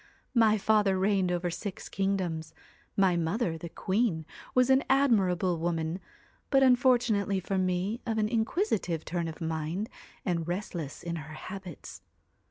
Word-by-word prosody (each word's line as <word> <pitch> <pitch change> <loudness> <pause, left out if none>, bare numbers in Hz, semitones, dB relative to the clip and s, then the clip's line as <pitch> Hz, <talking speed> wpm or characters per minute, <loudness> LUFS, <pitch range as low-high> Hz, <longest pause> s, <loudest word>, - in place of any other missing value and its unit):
My 220 -3 +5
father 205 -2 +3
reigned 190 -1 +2
over 175 0 -1
six 200 +2 -6
kingdoms. 180 -5 -2 0.4
My 190 -3 +4
mother, 170 +2 0
the 165 +1 -7
queen, 190 -3 0 0.3
was 255 +1 +5
an 265 +1 +5
admir 245 -9 +4
able 175 -1 0
woman, 165 +1 -1 0.5
but, 270 -1 +5
unfortunately 245 -6 +3
for 190 +1 -1
me, 185 +5 0
of 225 -1 0
an 215 -1 +2
inquisi 230 - +1
tive 165 -3 -3
turn 170 -1 -2
of 160 - -7
mind, 160 +5 -2 0.4
and 170 -3 -1
restless 175 -5 -4
in 170 0 -3
her 155 0 -8
habits. 185 -1 -8
190 Hz, 150 wpm, -29 LUFS, 170-220 Hz, 0.5 s, My